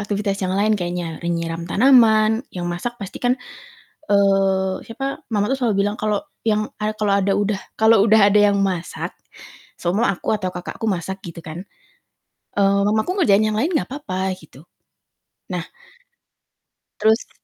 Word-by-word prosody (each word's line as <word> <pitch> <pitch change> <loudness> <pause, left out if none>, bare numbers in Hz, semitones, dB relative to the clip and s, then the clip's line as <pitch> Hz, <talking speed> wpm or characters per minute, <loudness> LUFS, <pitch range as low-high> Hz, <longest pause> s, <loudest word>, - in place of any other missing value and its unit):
aktifitas 205 -1 -2
yang 185 - -1
lain 210 +2 +2
kayaknya, 175 -2 -4
e 170 - -1
nyiram 170 0 -3
tanaman, 225 -1 +4
yang 175 -1 -4
masak 240 +8 -4
pasti 200 -1 -7
kan, 245 +1 +2 0.7
eee, 195 -1 +3
siapa, 270 +4 -5
mama 205 -1 +1
tuh - - +1
selalu 215 -5 +1
bilang 205 +1 -2
kalo 215 +7 -1 0.2
yang 215 -1 +1
a 215 0 0
kalau 210 -2 0
ada 195 +1 +1
udah 205 -1 0 0.2
kalau 220 -1 +5
udah 215 -2 +6
ada 210 - +5
yang 200 - 0
masak, 185 -2 -2 0.7
seumpama 195 +6 +1
aku - - -11
atau 185 -3 -3
kakakku 180 +5 -7
masak 190 +1 -3
gitu 170 -2 -8
kan, 165 +4 -7 0.9
eee, 200 0 +3
mamaku 220 - 0
ngerjain 215 - +4
yang 210 - -2
lain 320 +9 0
gak 305 - 0
apa-apa 190 -10 -3
gitu. 150 -4 -16 0.9
Nah - - -3 1.4
terus 220 +2 +2
200 Hz, 155 wpm, -21 LUFS, 185-220 Hz, 1.4 s, udah